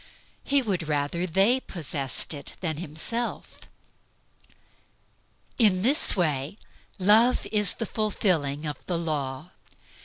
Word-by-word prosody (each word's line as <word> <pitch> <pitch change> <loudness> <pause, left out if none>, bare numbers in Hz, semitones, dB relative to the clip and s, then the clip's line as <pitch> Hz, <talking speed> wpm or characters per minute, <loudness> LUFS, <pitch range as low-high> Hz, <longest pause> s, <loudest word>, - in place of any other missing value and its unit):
He 280 -1 +2
would 185 -8 -2
rather 150 +4 -1
they 195 +9 +3
possessed 150 - -2
it 145 - -7
than 160 -5 -3
himself. 175 +9 -4 2.0
In 195 -5 +4
this 280 +7 +4
way 150 -2 -1 0.4
"Love 220 +6 +4
is 210 -2 +3
the 230 - -3
fulfilling 170 -10 0
of 150 -1 -6
the 175 - -1
law." 150 -1 -4
175 Hz, 110 wpm, -26 LUFS, 150-215 Hz, 2.0 s, In